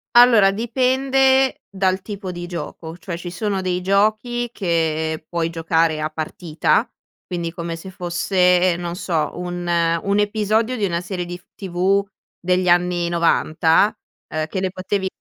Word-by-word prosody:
Allora, 230 -5 +7
dipende 265 +3 +2
dal 190 -1 0
tipo 200 -2 -6
di 175 0 -6
gioco, 165 -1 -7
cioè 175 -1 -6
ci 175 +1 -6
sono 195 +1 -2
dei 180 -1 -1
giochi 215 +5 +1
che 160 -4 -1
puoi 170 -1 -1
giocare 165 -1 +1
a 155 - -1
partita, 155 +1 0 0.4
quindi 170 -2 -4
come 170 -1 -5
se 190 +3 -9
fosse, 180 0 +2
non 175 0 -4
so, 160 -6 -1
un 175 0 -5 0.4
un 200 +1 +1
episodio 215 +3 +1
di 215 - -3
una 170 -3 0
serie 180 0 -4
dif 175 +1 -8
TV 195 +1 0 0.3
degli 180 0 0
anni 175 0 +2
90, 170 +2 +2 0.3
ehm, 155 0 -3
che 190 - -3
le 185 -1 -1
potevi 190 +1 -2
180 Hz, 145 wpm, -21 LUFS, 170-200 Hz, 0.4 s, Allora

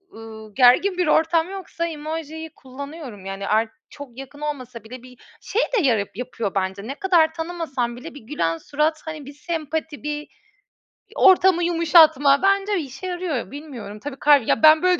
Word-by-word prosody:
ııı, 220 -1 -11
gergin 275 +10 +5
bir 360 - +1
ortam 325 +2 +2
yoksa 375 -3 -4
emojiyi 320 0 -6
kullanıyorum. 265 - -9
Yani 195 0 -5
ar 220 +1 +2 0.2
çok 275 -4 -11
yakın 270 +2 -10
olmasa 255 -6 -5
bile 245 +2 -10
bir 255 -1 -15 0.2
Şey 455 - -1 0.2
de - - +3
yara 225 -6 +2
yapıyor 230 -4 -4
bence. 190 +2 -2
Ne 275 - -5
kadar 330 -2 +3
tanımasam 325 -8 -3
bile 320 +6 -9
bir 290 - -10
gülen 165 - -2
surat, 300 - -1
hani, 310 -3 -7
bir 285 - -10
sempati, 315 -1 -4
bir, 300 - -3
iii, 295 0 -6 0.9
ortamı 375 -2 +5
yumuşatma 320 -5 +5
bence 395 0 +2
işe 275 +5 -7
yarıyor 350 -10 -3
bilmiyorum. 260 -8 -9
Tabii 275 +2 -7
kal 285 -5 +4
Ya, - - +1
ben 310 +2 +7
böyle 365 -1 +3
295 Hz, 170 wpm, -22 LUFS, 250-330 Hz, 0.9 s, ben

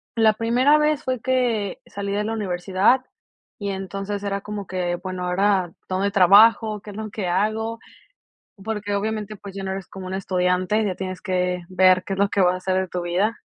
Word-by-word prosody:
la 220 -2 +4
primera 245 +7 +3
vez 300 -1 +1
fue 255 -2 -2
que 240 -6 0
salí 200 0 -5
de 205 +1 0
la 225 - -2
universidad 195 +4 +1 0.5
y, 200 -1 -4
entonces, 195 +1 -4
era 200 0 -2
como 205 -2 -6
que: 180 -1 -2
"Bueno, 185 -1 -4
ahora 185 -1 +1 0.2
¿dónde 190 +2 0
trabajo?, 210 +3 +5
¿qué 210 - -11
es 200 - -10
lo 215 0 -5
que 200 -4 -3
hago?" 220 +5 -1 0.8
Porque 210 -1 -3
obviamente, 215 0 -3
pues, 200 -1 -10
ya 195 - -5
no 190 - -3
eres 190 -1 -5
como 190 -1 -8
una 190 +1 -3
estudiante, 185 +2 +1
ya 195 -3 -1
tienes 185 0 -5
que 180 -1 -1
ver 185 0 +4
qué 195 - -4
es 195 - -4
lo 200 0 +3
que 200 - +1
va 180 0 +4
a - - -5
ser 185 0 0
de 190 - -3
tu 180 0 -4
vida. 190 +6 0
200 Hz, 205 wpm, -23 LUFS, 185-215 Hz, 0.8 s, trabajo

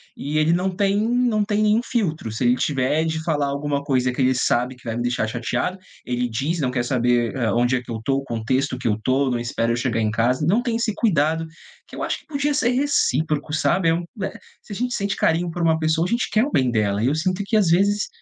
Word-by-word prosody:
e 150 +2 -3
ele 155 +2 +3
não 180 +2 +1
tem 195 +1 +1
não 230 0 +1
tem 205 0 0
nenhum 215 +2 +3
filtro, 170 - -2
se 115 +4 -2
ele 120 +1 +4
tiver 140 +3 0
de 160 0 -2
falar 150 -3 0
alguma 140 0 -2
coisa 130 -2 +1
que 130 - -2
ele 130 0 +3
sabe 125 0 0
que 125 - -22
vai 115 -1 -3
me 120 - -2
deixar 120 -2 0
chateado, 120 +9 -2 0.3
ele 125 0 -1
diz, 145 +9 -2
não 130 -2 0
quer 120 -2 -1
saber, 120 -1 +1
eh, 120 -4 0
onde 120 +2 +2
é 125 - -1
que - - -9
eu 110 -1 -4
tô, 135 - +2
o 140 - -3
contexto 130 +3 -1
que 125 - -3
eu 105 -2 +1
tô, 130 +2 +2
não 120 -1 -1
espera 115 0 -1
eu - - 0
chegar 120 -1 -1
em 110 -1 +1
casa, 120 +6 +1
não 215 +8 +2
tem 235 -3 -1
esse 230 -2 -1
cuidado 165 - +1 0.4
que - - -13
eu - - -5
acho - - -2
que - - -26
podia 290 -1 -1
ser 265 -4 +2
recíproco, 160 - 0
sabe. 165 +2 +2
Eh - - +3
u 170 +1 -2 0.2
eh 190 - -5 0.2
se - - -16
a - - -6
gente 245 +1 -1
sente 200 0 -2
carinho 170 +1 +1
por 175 - -5
uma 160 -1 +3
pessoa 160 +1 +1
a - - -6
gente 235 +2 0
quer 215 +4 +3
o 295 - -5
bem 130 - +2
dela, 105 -2 0
e - - +2
eu 140 - +1
sinto 185 +4 -1
que, 220 +2 +1
às 200 -6 +3
vezes, 200 +4 +2
150 Hz, 265 wpm, -22 LUFS, 125-195 Hz, 0.4 s, ele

